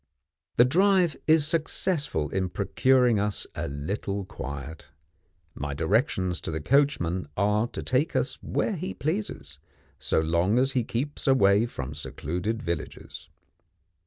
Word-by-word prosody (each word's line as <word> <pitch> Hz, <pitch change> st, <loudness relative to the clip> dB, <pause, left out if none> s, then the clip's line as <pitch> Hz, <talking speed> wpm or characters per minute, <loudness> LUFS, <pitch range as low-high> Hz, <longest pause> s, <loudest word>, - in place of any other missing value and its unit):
The 120 Hz, -, +7 dB
drive 180 Hz, +2 st, +3 dB
is 155 Hz, -1 st, +5 dB
successful 155 Hz, -, 0 dB
in 95 Hz, -1 st, -1 dB
procuring 125 Hz, +4 st, +3 dB
us 105 Hz, 0 st, -2 dB
a -, -, -3 dB
little 95 Hz, +7 st, -3 dB
quiet. 70 Hz, -4 st, -7 dB, 0.7 s
My 70 Hz, 0 st, -4 dB
directions 95 Hz, -, +1 dB
to -, -, -4 dB
the 80 Hz, 0 st, -2 dB
coachman 95 Hz, -, +1 dB
are 105 Hz, +3 st, +2 dB
to -, -, -6 dB
take 135 Hz, +6 st, 0 dB
us -, -, -1 dB
where 215 Hz, -, -1 dB
he 180 Hz, +4 st, -5 dB
pleases, 150 Hz, -, -3 dB, 0.4 s
so -, -, +1 dB
long 85 Hz, +7 st, +2 dB
as 135 Hz, +2 st, +3 dB
he 130 Hz, -3 st, +1 dB
keeps 140 Hz, +7 st, -3 dB
away 110 Hz, -4 st, +4 dB
from 70 Hz, -, -6 dB
secluded 90 Hz, +9 st, -4 dB
villages. 85 Hz, -3 st, -5 dB
105 Hz, 130 wpm, -27 LUFS, 85-140 Hz, 0.7 s, The